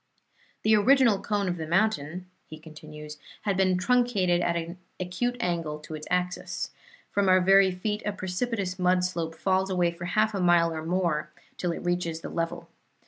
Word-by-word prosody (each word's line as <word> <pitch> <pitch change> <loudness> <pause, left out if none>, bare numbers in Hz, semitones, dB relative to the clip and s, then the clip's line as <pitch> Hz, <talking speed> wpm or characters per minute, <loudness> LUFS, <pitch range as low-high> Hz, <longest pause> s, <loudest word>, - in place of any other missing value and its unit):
"The 220 0 +5
original 230 -1 +4
cone 205 -1 -1
of 175 -1 -1
the 160 -1 -5
mountain," 180 -2 0 0.2
he 155 - -9
continues, 150 -1 -11 0.2
"had 200 -2 0
been 185 -1 +2
truncated 195 -5 +2
at 170 -1 0
an 170 +2 -4 0.2
acute 185 +7 -2
angle 165 -6 -2
to 155 - -9
its 155 0 -7
axis. 180 0 -2 0.4
From 200 -1 +2
our 185 0 +6
very 195 +1 +5
feet 210 +4 -3
a 210 - -1
precipitous 190 0 -3
mud 180 0 +3
slope 170 -3 -2
falls 190 +2 +1
away 180 -2 +1
for 170 +1 -8
half 215 +4 +1
a 195 - -1
mile 170 -2 +4
or 155 0 -5
more 165 -3 0 0.3
till 175 - -2
it 170 - -6
reaches 175 -2 -1
the - - -6
level. 165 0 -3
180 Hz, 180 wpm, -27 LUFS, 170-195 Hz, 0.4 s, our